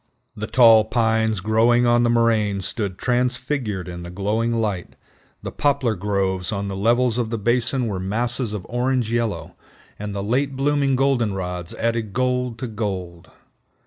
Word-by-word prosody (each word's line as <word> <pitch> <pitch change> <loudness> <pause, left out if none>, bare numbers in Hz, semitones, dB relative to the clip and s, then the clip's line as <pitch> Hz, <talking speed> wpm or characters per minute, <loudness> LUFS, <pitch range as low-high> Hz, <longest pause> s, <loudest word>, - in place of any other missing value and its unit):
The 110 +1 -5
tall 115 -4 +6
pines 110 -2 +1
growing 115 +4 +3
on 120 0 +4
the 120 - +2
moraines 110 -5 +2
stood 100 -5 -3
transfigured 125 -5 -1
in 85 -1 -7
the 85 - -8
glowing 105 +5 -1
light, 100 -5 -3 0.5
the - - -5
poplar 140 -5 +1
groves 95 -1 -1
on 100 -1 -3
the 95 - -4
levels 120 +4 +2
of 115 -2 -1
the 115 - -2
basin 120 +4 0
were 100 -4 -3
masses 115 +5 -1
of 105 -4 -5
orange 120 -1 0
yellow, 90 -8 -2 0.4
and 105 0 -5
the 100 - -3
late 135 +6 0
blooming 140 0 +1
goldenrods 100 -10 -1
added 115 -3 -2
gold 125 -1 0
to 125 - -4
gold. 95 -6 -5
110 Hz, 155 wpm, -22 LUFS, 100-120 Hz, 0.5 s, tall